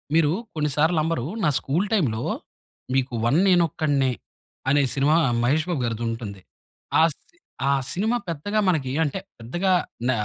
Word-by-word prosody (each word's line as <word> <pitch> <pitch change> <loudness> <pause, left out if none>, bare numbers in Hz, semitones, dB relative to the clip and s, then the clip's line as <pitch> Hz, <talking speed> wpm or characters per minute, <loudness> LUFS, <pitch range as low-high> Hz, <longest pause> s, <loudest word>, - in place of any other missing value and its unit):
మీరు 160 -2 +4 0.2
కొన్ని 150 -1 0
సార్లు 160 +3 +3
నమ్మరు. 155 -6 -1 0.2
నా 160 - +4
స్కూల్ 165 +9 0
టైమ్‌లో 125 - +1 0.7
మీకు 130 -1 0
'వన్ 140 +8 +3
నేనొక్కడినే' 155 -7 +2 0.6
అనే 145 +1 +4
సినిమా 145 +3 +3 0.3
'మహేష్ 145 +6 +2
బాబుగారిది' 120 -8 -1
ఉంటుంది. 110 -4 -6 0.6
ఆ - - +7
సిని 330 - -32 0.3
ఆ - - +4 0.2
సినిమా 220 +6 +1
పెద్దగా 185 +7 -1
మనకి 155 -8 +1
ఏం 150 - -1
అంటే 150 +6 -2 0.2
పెద్దగా 175 +12 -1 0.4
న - - +4
150 Hz, 145 wpm, -24 LUFS, 130-170 Hz, 0.7 s, ఆ